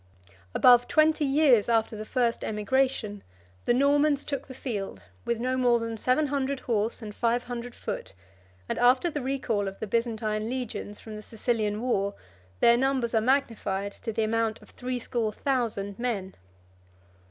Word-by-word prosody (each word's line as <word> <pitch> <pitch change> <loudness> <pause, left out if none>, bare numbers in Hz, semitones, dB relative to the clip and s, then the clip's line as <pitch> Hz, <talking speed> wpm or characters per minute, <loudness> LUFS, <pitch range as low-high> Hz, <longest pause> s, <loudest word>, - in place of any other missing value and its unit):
22 95 +1 -25 0.2
Above 245 -1 +6
twenty 310 -1 +3
years 270 -6 +4
after 225 -1 +2
the 215 0 -6
first 235 0 0
emigration, 215 -1 0 0.4
the - - +3
Normans 285 +3 +3
took 280 -2 -4
the 260 - -8
field 200 - -5 0.2
with 235 -1 -1
no 255 +2 0
more 245 -2 +4
than 230 -1 -3
seven 255 +7 +2
hundred 275 -1 -1
horse 225 0 -1
and 210 -1 -6
five 240 +1 +1
hundred 245 0 -6
foot; 95 - -6 0.5
and - - -2
after 255 +7 +4
the 295 - -3
recall 250 -6 -1
of 195 - -6
the - - -3
Byzantine 220 -1 -1
legions 245 -5 -4
23 - - -16
from 220 -1 -8
the - - -7
Sicilian 215 -1 -1
war, 200 -5 0 0.5
their 235 0 +6
numbers 260 -2 +1
are 220 - +3
magnified 220 -6 0
to 225 - -6
the 220 0 0
amount 225 0 0
of - - -18
threescore 245 -3 -2
thousand 220 -6 -2
men. 210 -6 -2
235 Hz, 165 wpm, -27 LUFS, 215-260 Hz, 0.5 s, Above